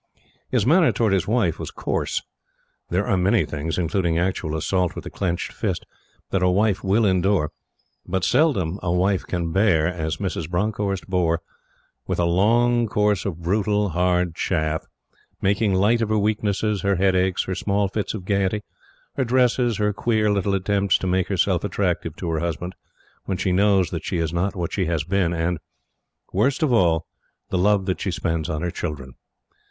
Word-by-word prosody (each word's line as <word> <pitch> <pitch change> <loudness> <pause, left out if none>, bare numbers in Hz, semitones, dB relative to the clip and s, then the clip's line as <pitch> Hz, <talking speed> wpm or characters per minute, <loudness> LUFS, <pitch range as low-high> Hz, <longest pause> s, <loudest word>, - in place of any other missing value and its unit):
His 120 -5 +1
manner 165 +5 +5
towards 110 -4 +1
his 95 - +1
wife 105 -7 +1
was - - -5
coarse. - - -2 0.7
There 95 +4 0
are 95 - +1
many 100 +5 +3
things 80 +2 -4
including 85 -1 0
actual 85 -3 -1
assault 90 +3 0
with - - -6
the - - -8
clenched 90 -3 -2
fist - - -3 0.5
that 95 - +1
a 90 - +4
wife 100 +1 +1
will 100 +4 +3
endure; 95 -4 +2 0.6
but 95 0 -1
seldom 105 - +2
a 85 - -1
wife 95 +2 +1
can 85 -2 -2
bear 95 -5 +3
as 80 -3 -2
Mrs. 90 -5 -3
Bronckhorst 100 +1 -1
bore 85 -3 0 0.6
with - - -1
a 85 - +2
long 115 +7 +3
course 105 -2 +1
of 85 -4 -4
brutal, 105 +2 +1
hard 90 0 +1
chaff, 80 -2 -1 0.5
making 100 0 +1
light 110 +5 +3
of 110 - 0
her 110 - +2
weaknesses, 105 -1 0
her 100 0 +1
headaches, 95 0 +2
her 95 - -3
small 100 +2 0
fits 105 +2 -3
of 95 -4 -7
gayety, 100 +1 0 0.5
her 135 - +2
dresses, 125 -2 +2
her 105 0 +1
queer 110 0 +1
little 100 0 +1
attempts 100 0 +2
to - - -5
make 95 0 +1
herself - - +1
attractive - - -1
to - - -6
her 80 - 0
husband 85 +2 -3 0.5
when 95 - -2
she 95 - 0
knows 95 -1 +3
that - - -4
she - - -2
is 80 -1 -1
not 90 +3 -1
what 85 -3 -3
she 95 - 0
has 80 -3 0
been, 90 +1 +1
and 85 0 -1 0.7
worst 130 +10 +1
of 140 -5 +2
all 85 -6 +3 0.4
the - - 0
love 100 0 +3
that 95 -1 -2
she 100 - -1
spends 80 -2 -2
on 75 +1 -2
her 90 - -1
children. 70 -8 -5
95 Hz, 180 wpm, -23 LUFS, 85-105 Hz, 0.7 s, manner